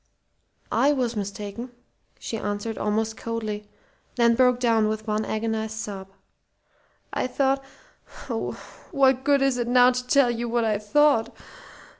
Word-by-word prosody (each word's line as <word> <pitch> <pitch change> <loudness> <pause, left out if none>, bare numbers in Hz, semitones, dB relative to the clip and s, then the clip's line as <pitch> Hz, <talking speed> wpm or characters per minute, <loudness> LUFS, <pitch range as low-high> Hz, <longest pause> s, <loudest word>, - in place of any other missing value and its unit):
"I 290 +2 +3
was 245 -4 -1
mistaken," 205 +3 -5 0.5
she - - -5
answered, 205 +1 -3
almost 220 +1 -1
coldly; 215 -3 -5 0.5
then 235 -1 +4
broke 250 0 +3
down 225 -3 +3
with 215 0 -4
one 215 0 -1
agonized 220 0 -2
sob. 200 -4 -6 1.1
"I - - -1
thought 270 +1 0 0.6
oh, - - -3 0.4
what 265 -4 +3
good 280 -1 +3
is 265 -2 +1
it 240 - -1
now 250 0 +6
to 250 0 -4
tell 260 -1 +4
you 235 0 -3
what 235 0 +1
I 215 -2 +1
thought?" 230 +2 +3
230 Hz, 140 wpm, -25 LUFS, 215-255 Hz, 1.1 s, now